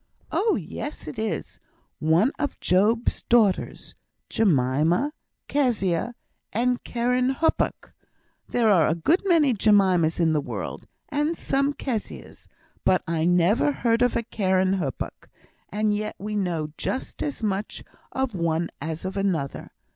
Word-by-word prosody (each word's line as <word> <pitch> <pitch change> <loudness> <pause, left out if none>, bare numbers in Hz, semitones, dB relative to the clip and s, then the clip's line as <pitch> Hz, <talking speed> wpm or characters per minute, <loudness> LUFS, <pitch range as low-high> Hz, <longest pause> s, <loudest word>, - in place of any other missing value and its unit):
"Oh 440 +1 +2
yes, 205 - -6
it 150 - -6
is. 220 0 -3 0.4
One 165 - +3
of 290 - -2
Job's 215 +6 +2
daughters; 220 -6 +2 0.4
Jemima, 165 - +2 0.3
Kezia, 235 - 0 0.4
and 245 +2 0
Keren 250 +2 0
Happuch. 325 - 0 0.6
There 230 -3 +3
are 170 -6 +5
a 160 - +1
good 305 - +2
many 320 -8 +4
Jemimas 190 -6 +3
in 165 -2 +3
the 150 - +1
world, - - -6 0.2
and 295 +2 0
some 275 +1 0
Kezias, 240 -7 -5 0.4
but 185 - +3
I 165 -1 0
never 180 - +3
heard 235 -4 +1
of 245 -1 +3
a 235 - 0
Keren 190 -3 +1
Happuch; 140 -7 -5 0.4
and 210 +1 +1
yet 215 +1 -3
we 210 +1 -5
know 170 -6 -1
just 260 - -3
as 285 -6 -3
much 205 0 -2 0.3
of 265 -3 -1
one 170 -2 -1
as 160 +3 -4
of 190 - -4
another. 175 -9 -2
205 Hz, 135 wpm, -25 LUFS, 170-245 Hz, 0.6 s, are